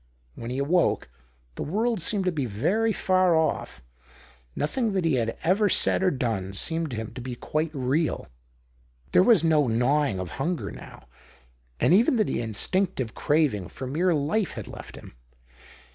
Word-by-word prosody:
When 115 - -7
he 125 - -3
awoke, 150 - +1 0.4
the - - -7
world 220 +5 -1
seemed 195 +3 +1
to 180 - +2
be 145 -6 -2
very 180 - 0
far 185 -4 +2
off; 160 - -1 0.7
nothing 220 - -1
that 190 -3 0
he 160 - +2
had 115 -3 -1
ever 200 +4 +3
said - - +3
or 190 - +3
done 110 - -2
seemed 160 +10 0
to 125 - -5
him 110 0 -5
to 125 - -7
be 125 0 -5
quite 155 +6 -2
real. 145 +3 -1 0.9
There - - +5
was 200 -4 +5
no 155 -4 +3
gnawing 125 0 +1
of 90 -2 -5
hunger 170 +3 -2
now, - - -12 0.7
and - - +3
even 230 +6 +4
the 215 - 0
instinctive 130 - -1
craving 145 - +1
for 130 - -7
mere 165 +8 +1
life 160 +8 0
had - - -7
left - - -10
him. - - -12
155 Hz, 165 wpm, -26 LUFS, 125-185 Hz, 0.9 s, There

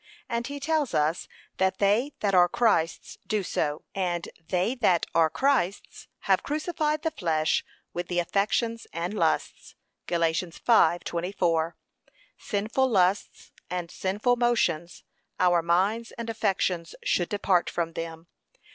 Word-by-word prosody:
And 235 +1 -2
he 285 0 -6
tells 300 -1 0
us 155 +3 +1 0.3
that 190 0 +1
they 215 +8 +2
that 200 -2 +1
are 175 -1 +6
Christ's 170 -9 0
do 215 -2 0
so. 150 -3 -2
'And 175 -3 -2 0.2
they 185 +6 +1
that 210 -9 +2
are 165 -1 +4
Christ's 245 - -1
have - - +2
crucified 305 0 -1
the 320 - 0
flesh 160 - 0 0.3
with 175 0 -4
the 175 - -3
affections 215 +6 0
and 170 +4 -3
lusts.' 215 - -1 0.3
(Gal. 170 -1 0
5:24) 170 -1 +1 0.6
Sinful 220 +6 -1
lusts 195 -2 +1 0.2
and 180 -2 -4
sinful 210 +6 0
motions 180 -9 0 0.4
our 175 -2 +4
minds 195 +7 +1
and 230 -1 -4
affections 185 -5 -1
should 175 - +1
depart 195 -3 +1
from 165 -1 -2
them. 165 0 -6
185 Hz, 130 wpm, -27 LUFS, 170-230 Hz, 0.6 s, are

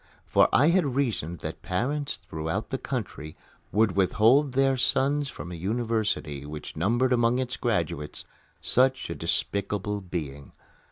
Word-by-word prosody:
For - - +4
I 150 +5 +5
reasoned 125 - -1
that - - -6
parents 140 +10 -1
throughout 80 +1 -3
the - - -2
country 75 +1 -5 0.4
would 110 -1 +3
withhold 120 +8 +4
their 135 0 +3
sons 140 +3 +1
from 90 - -8
a - - -5
university 105 - -1
which 75 +1 -8
numbered 120 +10 +2
among 120 0 +3
its 125 -1 -2
graduates 85 - -2 0.4
such 130 +1 +2
a - - -1
despicable 105 0 -1
being. 75 -7 -6
110 Hz, 130 wpm, -27 LUFS, 85-130 Hz, 0.4 s, I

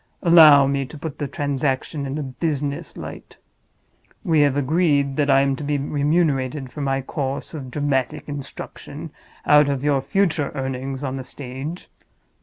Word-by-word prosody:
Allow 155 -5 +8
me 140 0 0
to 155 - -10
put 150 0 -7
the 145 - -2
transaction 140 +1 -2
in 135 +2 -4
a 150 - -2
business 140 +1 -3
light. - - -9 0.9
We 160 -3 +3
have 145 -1 +3
agreed 145 -1 +2
that 145 -1 +1
I 135 0 +6
am 135 0 +1
to - - -6
be 145 0 0
remunerated 145 -2 0
for 150 - -6
my 135 -1 0
course 135 +2 -4
of 140 -5 -6
dramatic 145 +1 -1
instruction 145 -2 -8 0.3
out 150 -1 +6
of 140 -1 -2
your 145 -2 +2
future 165 -4 +1
earnings 135 0 -4
on 135 -1 -3
the 130 - -5
stage. 135 +6 -7
140 Hz, 160 wpm, -22 LUFS, 135-150 Hz, 0.9 s, Allow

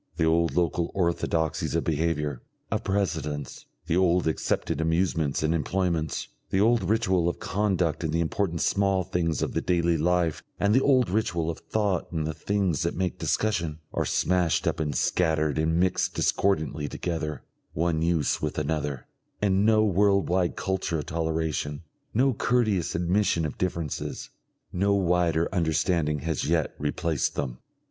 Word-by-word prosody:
The 80 - +2
old 85 +1 +2
local 85 -1 +1
orthodoxies 85 -3 0
of - - +1
behaviour, 75 -4 -1 0.3
of - - -1
precedence, 80 -7 -2 0.2
the 80 - 0
old 90 -1 +3
accepted 80 +1 -1
amusements 80 -3 0
and 80 +1 +2
employments, 85 -2 -1 0.2
the 95 - +1
old 115 +3 +4
ritual 95 -6 +2
of - - -4
conduct 90 -6 0
in 80 - -1
the 80 +2 0
important 85 0 -1
small 100 -2 +2
things 85 -4 -1
of - - -2
the - - 0
daily 85 -2 +1
life 85 -1 +1 0.2
and 100 +1 +3
the 130 - +5
old 130 -3 +4
ritual 85 -6 0
of 80 - -8
thought 105 -5 -1
in 80 -2 -1
the 80 +1 -2
things 95 -5 0
that - - -1
make 90 -1 -2
discussion, 85 -8 0 0.2
are - - 0
smashed 90 -4 +1
up - - 0
and 75 -2 -1
scattered 80 -3 +1
and 80 +2 +1
mixed 90 0 +1
discordantly 80 -6 0
together, 80 -3 -4 0.3
one 80 0 0
use 85 -3 +1
with - - -2
another, 75 -3 -2 0.3
and 100 0 +2
no 110 -1 +4
world 100 0 +3
wide 90 0 +1
culture 95 -3 -1
of 75 - -4
toleration, 80 -2 -2 0.3
no 130 +3 +3
courteous 110 -7 +1
admission 90 -1 +1
of 75 - -4
differences, 85 -5 -3 0.4
no 100 +2 +2
wider 85 -3 +2
understanding 80 -3 +1
has 80 -3 -2
yet - - +1
replaced 75 0 -1
them. 65 -4 -3
85 Hz, 155 wpm, -26 LUFS, 80-95 Hz, 0.4 s, the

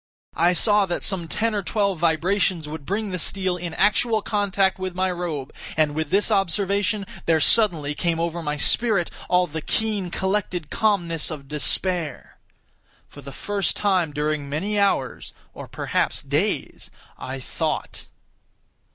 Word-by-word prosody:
I 175 +2 +5
saw 205 +2 +3
that 175 - -2
some 180 -4 0
ten 225 +7 0
or 205 - 0
twelve 200 -2 0
vibrations 170 +1 +1
would 150 -2 -7
bring 205 +1 -2
the 180 - -2
steel 185 +2 +1
in 175 -2 -5
actual 215 +1 +2
contact 195 -2 +1
with 185 -1 -4
my 185 0 +1
robe, 165 -6 -4 0.2
and 155 -2 +3
with 155 0 -2
this 205 +5 +2
observation 200 +1 +1 0.2
there 165 -1 +4
suddenly 160 -6 +3
came 165 +2 -1
over 170 0 -2
my 150 -2 -2
spirit 200 +2 +2 0.2
all 180 0 +4
the 160 -1 -5
keen, 210 0 -1
collected 190 -4 -2
calmness 175 -8 +1
of 145 -4 -7
despair. 155 +3 -2 0.7
For 145 - -12
the 140 0 -9
first 200 +6 -1
time 185 -6 +1
during 150 -1 -2
many 200 +8 -1
hours—or 195 -10 -2
perhaps - - -1
days—I 130 +1 -4
thought. 130 - -4
180 Hz, 145 wpm, -23 LUFS, 160-200 Hz, 0.7 s, I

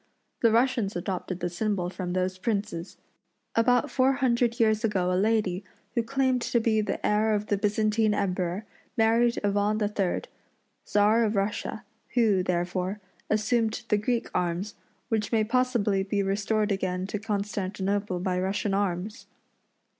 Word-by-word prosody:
The 230 - +5
Russians 235 -3 +2
adopted 180 0 -3
the 175 - 0
symbol 180 -1 -1
from 180 -2 -4
those 185 0 -1
princes. 200 -5 -3 0.6
About 245 +1 +3
four 265 0 +3
hundred 240 -2 +1
years 220 -1 +3
ago 185 -5 +1
a - - +1
lady, 200 -1 +1 0.3
who 235 - +2
claimed 260 +1 +1
to 235 - +1
be 220 -1 +2
the 210 - -3
heir 215 +1 +3
of 205 0 -2
the 205 - +1
Byzantine 215 +1 +2
Emperor, 185 +1 -1 0.3
married 230 +1 +3
Ivan 205 +1 +1
III., 205 -3 0 0.7
Czar 210 +3 +4
of 215 -1 0
Russia, 200 +1 -2 0.3
who, 215 -6 +4
therefore, 180 +2 -1 0.3
assumed 220 +1 +1
the 210 - +4
Greek 235 +2 -1
arms, 180 +4 -1 0.4
which 220 -3 0
may 225 -2 +3
possibly 230 -4 +1
be 200 +1 0
restored 205 +2 0
again 185 -1 -1
to 200 +2 -4
Constantinople 200 -2 -2
by 180 0 -1
Russian 195 +2 -1
arms. 200 +3 -2
210 Hz, 145 wpm, -27 LUFS, 190-225 Hz, 0.7 s, The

